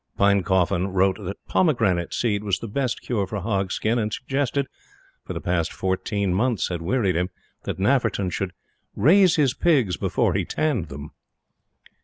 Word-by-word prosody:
Pinecoffin 95 -2 +2
wrote 95 0 +2
that 95 +2 -7
pomegranate 105 - +1
seed 105 -3 0
was 100 -3 0
the 115 - -7
best 125 +2 -2
cure 105 -6 -1
for 105 +2 -4
hog 95 -1 -1
skin, 115 +2 0
and 110 -1 -1
suggested 140 +3 -1 0.6
for - - -6
the - - -4
past 85 -1 -1
fourteen 95 +1 -1
months 110 -1 +1
had 85 -2 -3
wearied 95 0 +1
him 90 +2 0 0.4
that - - -3
Nafferton 100 -3 +1
should 95 -1 -3 0.4
"raise 180 - +5
his 140 -5 +2
pigs 130 - +2
before - - +1
he - - 0
tanned 135 - -1
them." 70 +1 -9
100 Hz, 160 wpm, -24 LUFS, 95-125 Hz, 0.6 s, raise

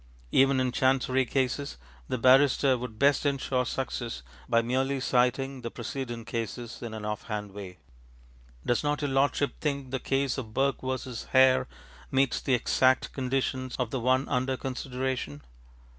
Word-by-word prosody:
ŌĆØ - - -26 0.2
Even 135 0 +4
in 130 -1 +1
Chancery 130 0 +2
cases, 135 - -1 0.3
the - - -1
barrister 130 +2 +5
would 120 -3 -6
best 140 +3 +3
insure 135 -3 0
success 120 - -3 0.3
by 115 - +4
merely 130 +4 0
citing 130 +1 +1
the 115 - -4
precedent 120 -1 -5
cases, 115 +1 -5
in 115 -2 -5
an 105 -1 -6
off 105 -1 -4
hand 105 -2 -4
way, 95 -2 -9 0.9
ŌĆ£Does 120 +1 +1
not 145 0 0
your 145 - 0
lordship 140 +1 +1
think 140 -4 -2
the 130 - -1
case 135 0 0
of 110 -4 -8
Burke 135 +1 +1
v. 130 0 -1 0.4
Hare 130 0 +5 0.4
meets 135 -1 +2
the 130 - +2
exact 130 +2 +2
conditions 130 -1 -1
of 125 -3 -2
the 130 - -1
one 130 +3 +2
under 130 0 0
consideration? 130 - -4
130 Hz, 160 wpm, -28 LUFS, 120-135 Hz, 0.9 s, barrister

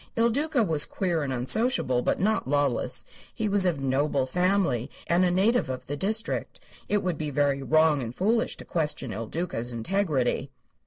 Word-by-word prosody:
Il 230 +1 +3
Duca 285 0 +1
was 160 -7 +1
queer 175 -4 -1
and 140 -2 -2
unsociable, 130 - +1
but - - 0
not 215 -3 +1
lawless. 145 -3 +1 0.3
He 220 - -2
was 200 -2 +3
of 165 -5 0
noble 135 0 0
family 180 - +1 0.2
and 175 +2 +2
a 180 - +3
native 195 - +2
of 130 -1 -5
the 145 - -4
district. 215 +8 -1 0.3
It 205 -1 +1
would 180 -4 -2
be 155 -1 -2
very 140 -1 +1
wrong 155 0 +3
and 120 0 -6
foolish 225 +5 +1
to - - -10
question 150 -7 -2
Il 110 +3 -5
Duca's 140 -7 -4
integrity. 140 - -1
160 Hz, 175 wpm, -26 LUFS, 135-200 Hz, 0.3 s, Il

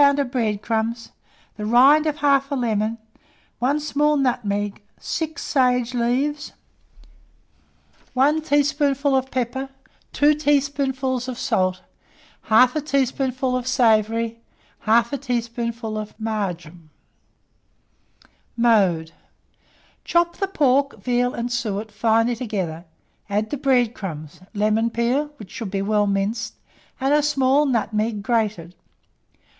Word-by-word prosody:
of 280 -2 +3
bread 215 -5 -1
crumbs, 230 +1 -2 0.5
the 210 - -5
rind 270 +8 +5
of 300 - 0
1/2 275 0 +2
lemon, 220 -1 0 0.6
1 275 +5 +1
small 300 0 +1
nutmeg, 205 -7 -1 0.2
6 320 0 -4
sage 250 -3 +1
leaves, 265 +5 -1 1.6
1 290 +5 +3
teaspoonful 285 -2 +1
of 265 0 0
pepper, 265 +1 -3 0.4
2 295 +1 +4
teaspoonfuls 275 -3 0
of 255 -2 -5
salt, 185 -8 0 0.7
1/2 250 +7 +5
teaspoonful 265 -2 0
of 255 -1 -3
savory, 230 -2 +2 0.5
1/2 235 +5 +3
teaspoonful 235 -3 -3
of 215 +1 -8
marjoram. 175 -7 -4 1.7
Mode. 195 -9 +3 0.9
Chop 345 0 +1
the 390 - -1
pork, 280 -6 +1
veal, 245 0 0
and 240 +1 -3
suet 220 -3 -3
finely 225 +3 +2
together, 190 -8 -4 0.4
add 210 +2 -1
the - - 0
bread 250 -4 +2
crumbs, 155 -8 -7 0.2
lemon 215 +2 +1
peel 240 +6 0
(which 210 -8 -11
should 230 -6 -5
be 195 0 -2
well 210 0 +1
minced), 205 +3 -2 0.4
and 270 +2 +1
a 300 - +4
small 285 0 +2
nutmeg 215 -3 -1
grated. 210 -7 -1
240 Hz, 110 wpm, -22 LUFS, 215-275 Hz, 1.7 s, rind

